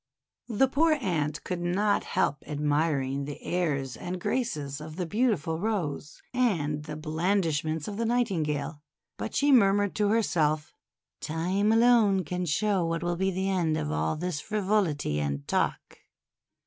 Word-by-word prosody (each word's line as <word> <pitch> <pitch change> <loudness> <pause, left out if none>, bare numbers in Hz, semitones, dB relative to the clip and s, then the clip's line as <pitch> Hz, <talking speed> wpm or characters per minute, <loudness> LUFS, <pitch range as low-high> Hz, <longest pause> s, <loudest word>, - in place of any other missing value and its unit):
The 240 +4 +3
poor 310 +5 +3
Ant 165 - -1
could 180 -1 -3
not 200 +4 +1
help 145 - 0
admiring 145 -2 0
the 145 0 -7
airs 140 -8 -1
and 180 +1 -5
graces 150 - -2
of 155 0 -8
the 180 0 -2
beautiful 175 - 0
Rose 175 -8 -3
and 155 -12 0
the 150 -1 -6
blandishments 160 -1 -1
of 205 - -5
the 230 - 0
Nightingale, 160 - -1 0.4
but - - -5
she 285 0 +3
mur 200 -7 +6
mured 205 -1 +1
to 210 -1 +2
herself: 160 -8 +1 0.2
— - - -61
'Time 185 +7 0
alone 225 -4 +4
can 180 +2 -3
show 195 +4 +1
what 165 0 -1
will 175 0 0
be 190 +2 0
the 190 +1 -1
end 165 -5 +1
of 75 - -2
all 80 +1 0
this 175 -2 -3
frivolity 195 - 0
and 70 -1 -3
talk." - - -1
175 Hz, 155 wpm, -28 LUFS, 150-205 Hz, 0.4 s, mur